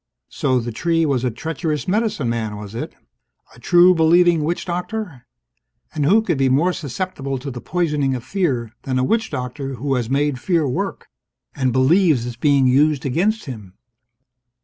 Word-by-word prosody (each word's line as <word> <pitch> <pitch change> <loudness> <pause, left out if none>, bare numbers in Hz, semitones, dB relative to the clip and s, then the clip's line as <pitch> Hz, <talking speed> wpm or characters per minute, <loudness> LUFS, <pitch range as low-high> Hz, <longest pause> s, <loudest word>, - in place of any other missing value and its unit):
So 130 -3 0
the 120 0 -4
tree 165 +7 0
was 135 -5 0
a 125 - +1
treacherous 155 +3 -3
medicine 205 - 0
man, 110 -3 -2
was 105 0 -9
it? 115 - -6 0.6
A - - -16
true 175 +7 +5
believing 170 0 +4
witch 170 +3 -2
doctor? 180 - -5 0.7
And 150 -2 -1
who 220 +5 +4
could 170 -10 -1
be 135 -1 +3
more 160 +8 +2
susceptible 140 -3 -4
to 135 +2 -6
the 120 -1 -7
poisoning 150 -6 0
of 120 - -6
fear 130 - -1
than 130 -1 -2
a 130 - +1
witch 225 - 0
doctor 130 +2 -5
who 135 +3 -2
has 120 -3 -1
made 140 -1 0
fear 170 -5 +1
work 125 - -3 0.5
and 130 -2 0
believes 135 +1 +3
it's 120 -1 -5
being 140 +2 +3
used 140 +2 +3
against 200 - 0
him? 105 - -9
140 Hz, 170 wpm, -20 LUFS, 125-175 Hz, 0.7 s, true